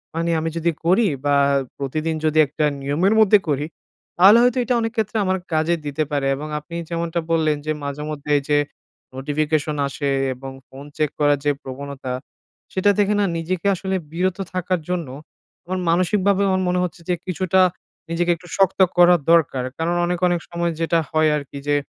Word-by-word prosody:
মানে 165 +1 -1
আমি 165 +1 -2
যদি 170 +1 +1
করি 190 +7 +4 0.2
বা 145 0 +3 0.4
প্রতিদিন 155 +4 -2
যদি 155 0 +1
একটা 150 +2 -1 0.2
নিয়মের 150 +9 +1
মধ্যে 210 0 +6
করি, 145 +1 0 0.5
তাহলে 195 +6 +8
হয়তো 250 +1 +2
এটা 245 +1 0
অনেক 225 0 -1
ক্ষেত্রে 220 0 -1
আমার 190 0 +1 0.2
কাজে 160 +2 +2
দিতে 145 +2 -1
পারে। 140 -1 0
এবং 150 +2 -6
আপনি 170 +3 -11
যেমনটা 170 0 -2
বললেন 155 -2 +2
যে, 155 - -1
মাঝেমধ্যে 150 +1 -5
এই - - -1
যে 145 - +4 0.6
notification 150 +2 -1
আসে 140 +1 -3 0.2
এবং 135 +1 -9 0.2
ফোন 135 +2 -11
check 150 -2 +1
করার 145 -1 +3
যে 145 - +4
প্রবণতা, 135 0 -6 0.6
সেটা 190 +2 +2
থেকে 205 0 +2
না 205 - +3
নিজেকে 180 +3 -2
আসলে 190 +1 -3 0.2
বিরত 180 +2 -1 0.2
থাকার 185 -1 -1
জন্য, 175 -5 -2 0.6
আমার 185 +1 -3
মানসিকভাবে 185 +3 +2
আমার 185 0 +1
মনে 180 0 +1
হচ্ছে 180 0 -5
যে 180 - +2
কিছুটা 185 +1 +1 0.5
নিজেকে 175 +1 +1
একটু 175 +2 -16
শক্ত 195 -1 +2 0.2
করা 175 0 +7 0.2
দরকার। 145 -6 +3
কারণ 170 +2 -1
অনেক, 175 0 -1
অনেক 175 -1 +1
সময় 170 0 -1
যেটা 165 0 +2
হয় 155 0 +3
আরকি 140 -1 -8
যে 145 - +3
165 Hz, 175 wpm, -21 LUFS, 150-185 Hz, 0.6 s, তাহলে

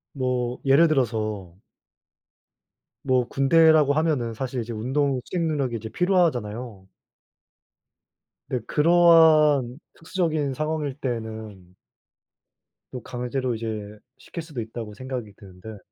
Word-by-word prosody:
뭐 125 -2 -2
예를 140 +5 +5
들어서 110 - -2 1.5
뭐 130 -2 +2
군대라고 155 +1 +4
하면은 145 -7 0
사실 125 +2 -4
이제 115 +1 -7
운동 130 +4 -1
수행 170 -2 -2
능력이 140 -6 -1
이제 110 -1 -6
필요하잖아요. 125 - -1 1.6
근데 125 -3 -2
그러한 155 -5 +4 0.2
특수적인 160 -5 -2
상황일 150 -1 -3
때는 110 -8 -6 1.2
또 125 - -7
강제로 125 +1 -3
이제 110 -2 -6 0.2
시킬 170 - -8
수도 150 -7 -6
있다고 110 -1 -7
생각이 125 -3 -6
드는데 100 +2 -12
130 Hz, 250 characters per minute, -24 LUFS, 110-150 Hz, 1.6 s, 예를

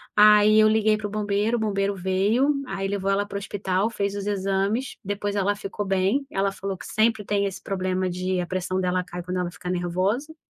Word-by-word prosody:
Aí 210 0 +7
eu 215 - +6
liguei 215 0 +3
para 210 -1 -4
o - - -8
bombeiro, 210 +2 0
o - - -3
bombeiro 200 -1 0
veio, 200 +10 +2
aí 195 0 -3
levou 195 -1 -1
ela 200 +1 +1
para 205 - -10
o - - -2
hospital, 200 +1 -1
fez 200 -2 -2
os 200 0 -4
exames, 200 +5 -1
depois 205 +1 -3
ela 205 +1 +1
ficou 205 0 -5
bem. 195 +8 +1
Ela 195 0 0
falou 195 -1 -5
que - - -10
sempre 220 -1 +1
tem 200 0 0
esse 195 - -5
problema 185 -1 -1
de 185 +1 -2
a - - -3
pressão 185 0 -2
dela 180 0 +1
cai 175 -1 -7
quando 180 +1 -3
ela 175 -1 -1
ficar 180 0 -7
nervosa. 185 - -1
200 Hz, 215 wpm, -24 LUFS, 185-210 Hz, -, Aí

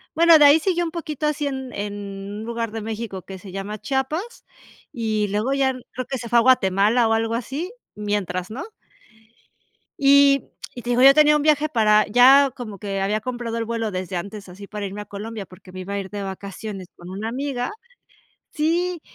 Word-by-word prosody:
Bueno, 335 -1 +7
de 295 - +8
ahí 290 +3 +7
siguió 350 0 0
un 330 - -3
poquito 310 -3 -3
así 300 0 -1
en 265 -2 -5
en 205 0 -4 0.5
un - - -6
lugar 230 -1 -3
de 225 0 -5
México 220 -3 -5
que 190 +1 -9
se 190 0 -11
llama 195 +3 -5
Chiapas, 305 - -3 0.5
y 215 -3 -1
luego 210 +7 -1
ya 270 -1 +2 0.2
creo 255 0 -5
que 265 - -3
se 235 - -7
fue 240 - +5
a - - +5
Guatemala 225 -1 +3
o 225 - +2
algo 225 +1 0
así, 275 - -4 0.2
mientras, 205 -3 -2
¿no? 260 - -6 1.3
Y 280 0 +5 0.2
y 245 - -8
te 245 - -2
digo, 245 +1 +2
yo 275 +1 +8
tenía 300 0 +6
un 300 - +1
viaje 305 0 +2
para 215 -5 +4
ya 260 +5 +6
como 215 -5 -7
que 195 0 -3
había 205 +2 0
comprado 240 0 -4
el 230 - -2
vuelo 230 -1 -2
desde 185 -1 -4
antes 200 +3 -6
así 195 +2 -11
para 210 -1 -5
irme 200 +1 -6
a 210 - -8
Colombia 210 0 -7
porque 185 0 -15
me 185 - -8
iba 195 +2 -5
a - - -1
ir 190 0 -7
de 205 - -5
vacaciones 195 0 -7
con 175 - -12
una 205 +4 -4
amiga 255 0 -3 0.8
sí, 340 +3 0
230 Hz, 205 wpm, -22 LUFS, 205-275 Hz, 1.3 s, de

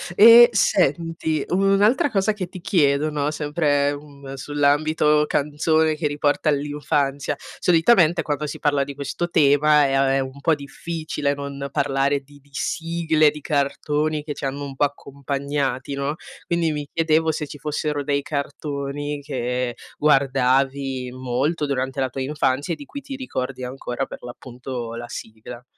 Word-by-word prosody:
E 230 +3 +9
senti, 165 - +1
un'altra 195 +8 +3
cosa 210 0 +1
che 195 -4 -5
ti 185 +1 -10
chiedo, 150 -4 +2
no, 150 0 -1
sempre, 145 -2 0
mhmm, 140 -2 -11
sull'ambito 150 +2 +2
canzone 155 +2 +1
che 150 -1 -1
riporta 145 +1 0
all'infanzia. 145 -1 -1 0.2
Solitamente 170 -1 +4
quando 150 0 -2
si - - -6
parla 145 -2 +2
di 140 0 -7
questo 145 +5 -3
tema 150 -1 +4
è, 135 0 +2
uhm, 130 - -1
un 140 - -14
po' 160 0 +3
difficile 150 +1 -3
non 140 -1 -6
parlare 140 0 +1
di 145 +1 -19
di 145 - -27
sigle, 160 0 +1
di 150 - -9
cartoni 150 +2 -1
che 150 -1 -4
c'hanno 140 +1 -4
un 135 -1 -8
po' 145 - +1
accompagnati, 140 -1 -3
no, 140 +2 -2 0.3
quindi 170 -2 0
mi 150 -1 -4
chiedevo 160 0 +2
se 150 -1 -4
ci 145 - -9
fossero 150 -1 -2
dei 140 0 0
cartoni 145 -1 -4
che 125 -3 -2 0.2
guardavi 135 -2 +1
molto 130 +5 -1
durante 135 0 -2
la 130 -1 0
tua 135 +2 -5
infanzia 140 +3 0
e - - -3
di 290 - -10
cui 285 0 -8
ti 275 0 -7
ricordi 130 - -4
ancora 125 0 -4
per, - - -11
l'appunto, 120 -1 -7
la 120 0 -6
sigla. 120 +1 -9
145 Hz, 150 wpm, -22 LUFS, 135-155 Hz, 0.3 s, E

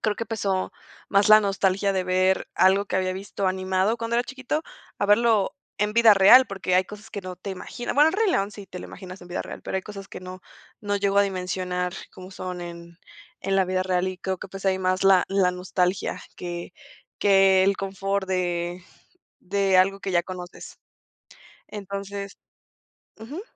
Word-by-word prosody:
creo 210 -2 0
que 230 - -4
pesó 195 -4 -1 0.4
más 200 +1 +3
la 215 - +9
nostalgia 195 -1 +1
de 185 - 0
ver 185 +1 +1
algo 190 +2 +4
que 185 - -2
había 185 0 0
visto 195 0 -4
animado 190 +3 0
cuando 230 0 -2
era 240 - +3
chiquito 270 +4 -3 0.4
a 200 - 0
verlo 215 -1 +3 0.3
en 210 0 +1
vida 230 -2 +7
real, 200 +7 +8
porque 190 -2 -2
hay 185 +1 +4
cosas 210 +2 -12
que 200 - -6
no 185 -1 -6
te 195 +2 -7
imaginas. 240 +6 -5
bueno, 295 +2 +6
el - - -6
Rey 420 -1 +2
León 200 - 0
sí 200 -1 -11
te 180 - -9
lo - - -8
imaginas 185 0 -10
en 175 - -13
vida 175 - -3
real, - - -9
pero - - -3
hay 190 - -2
cosas 195 -2 -9
que - - -9
no 185 0 -9 0.4
no 205 -1 -1
llego 200 0 +1
a - - +7
dimensionar 180 -1 -2 0.2
como 185 0 -11
son 180 -1 -6
en 170 0 -9 0.4
en 195 0 0
la 190 - +4
vida 185 0 0
real 185 0 0
y 185 0 -6
creo 190 0 -3
que - - -8
pues 195 0 -9
hay 190 -1 +2
más 185 0 0
la 195 -2 +6
la 195 -2 +2
nostalgia 180 +1 -1 0.2
que 175 -1 -6 0.5
que 195 -1 +5
el 195 0 +2
confort 195 0 -2
de 175 -1 -2 0.6
de 195 0 +1
algo 195 +2 +3
que 195 - -4
ya 175 -1 +2
conoces. 180 -1 -9 0.9
Entonces 200 0 -6 0.8
ujú. 275 - -7
190 Hz, 195 wpm, -25 LUFS, 185-200 Hz, 0.9 s, la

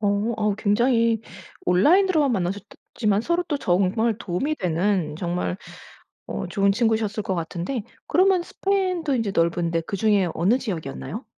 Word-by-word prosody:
어 205 +2 +1
아 210 -2 +1
굉장히 230 +1 +2 0.5
온라인으로만 305 - +4
만나셨더 195 0 -3 0.2
지만 210 -3 +1
서로 340 +8 0
또 295 - 0
정말 200 +3 +1
도움이 230 - -2
되는 180 - 0
정말 175 +1 -2 0.7
어 - - -4
좋은 200 -1 +2
친구셨을 220 -1 0
것 190 - -2
같은데 175 +8 -3 0.2
그러면 370 -1 +3
스페인도 370 -6 -1
인제 225 -5 -1
넓은데 170 0 +1
그중에 200 +2 +1
어느 190 +9 +3
지역이었나요? 160 - -5
205 Hz, 330 characters per minute, -23 LUFS, 180-245 Hz, 0.7 s, 온라인으로만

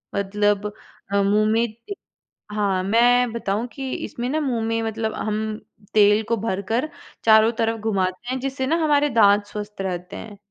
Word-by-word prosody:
मतलब 205 +1 0 0.4
अ, 200 0 +3
मुँह 210 +2 +3
में 225 - +3
ए 235 - -6 0.6
हाँ, 195 -3 0
मैं 240 +4 +3
बताऊँ 215 0 -2
कि 265 +2 -5
इसमें 240 +1 -5
ना 310 +3 0
मुँह 255 -6 -1
में 225 0 0
मतलब 220 0 -2
हम 215 -1 -2 0.6
तेल 210 0 +5
को 230 - +3
भरकर 225 +6 -2 0.4
चारों 220 0 +6
तरफ 225 0 0
घुमाते 200 +1 -2
हैं 260 - -2
जिससे 265 0 -3
ना 320 - +2
हमारे 295 -1 +3
दाँत 205 -4 +4
स्वस्थ 210 -1 -7
रहते 180 -2 -4
हैं। 205 -2 -9
220 Hz, 165 wpm, -22 LUFS, 205-235 Hz, 0.6 s, चारों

